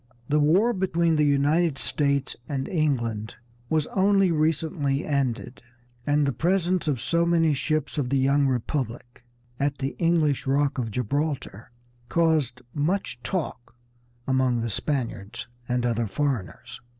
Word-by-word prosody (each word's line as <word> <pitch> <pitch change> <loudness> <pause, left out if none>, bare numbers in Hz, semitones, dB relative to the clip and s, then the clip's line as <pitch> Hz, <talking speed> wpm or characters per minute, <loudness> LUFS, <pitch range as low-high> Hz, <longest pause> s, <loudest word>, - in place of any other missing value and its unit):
The 150 +1 +3
war 185 +11 +4
between 170 -4 +1
the 150 - +3
United 145 +2 +2
States 140 -2 0
and 135 -2 -2
England 120 - -1 0.3
was 155 -2 +2
only 195 -1 +4
recently 155 -2 0
ended, 135 -4 -2 0.5
and 145 0 +3
the 140 - 0
presence 180 - +1
of 140 -5 +1
so 170 +8 +1
many 165 -2 +3
ships 155 +1 -1
of 130 -4 -1
the 135 - +2
young 140 +1 +3
Republic 120 -2 -3 0.4
at 140 0 0
the 135 0 -3
English 160 -5 +2
Rock 140 0 +1
of 115 -3 -2
Gibraltar 130 -1 -3 0.4
caused 155 -7 +1
much 150 -5 -1
talk 145 -10 -4 0.5
among 130 -3 +2
the 115 -1 -2
Spaniards 115 -6 -3 0.2
and 125 0 0
other 115 -1 0
foreigners. 130 - -3
145 Hz, 135 wpm, -25 LUFS, 130-160 Hz, 0.5 s, war